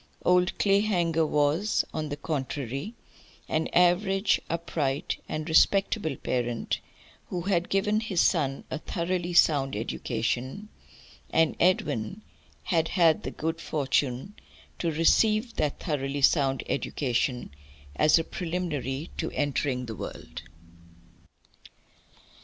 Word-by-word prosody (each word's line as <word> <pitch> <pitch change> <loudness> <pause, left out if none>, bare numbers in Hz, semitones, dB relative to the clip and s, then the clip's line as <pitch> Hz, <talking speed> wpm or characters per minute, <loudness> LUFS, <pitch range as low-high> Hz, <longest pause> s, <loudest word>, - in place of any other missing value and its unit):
Old 180 0 +3
Clayhanger 180 -6 +2
was, 150 +8 +1
on 155 -1 -3
the 145 - -4
contrary, 140 - -4 0.5
an 160 +1 0
average 190 +3 +3
upright 160 -2 -2
and 155 +1 -3
respectable 180 0 +3
parent 120 -3 -2 0.5
who 175 - -3
had 180 -1 0
given 210 +2 +2
his 215 -6 -2
son 140 -7 +2
a 160 - -2
thoroughly 175 +1 -2
sound 145 -7 +4
education, 120 - -3 0.6
and 160 -1 +2
Edwin 165 - +1 0.4
had 165 -2 +1
had 165 -4 +3
the - - -4
good 160 +1 -3
fortune 140 +3 -1 0.5
to 170 - 0
receive 215 +9 +3
that 150 -2 -1
thoroughly 140 -3 -2
sound 135 -3 +3
education, 125 - -1 0.4
as 155 +2 +5
a 165 - 0
preliminary 160 -5 -3
to 160 - -2
entering 140 -3 -1
the 115 - -6
world. - - -8
160 Hz, 110 wpm, -27 LUFS, 140-180 Hz, 0.6 s, as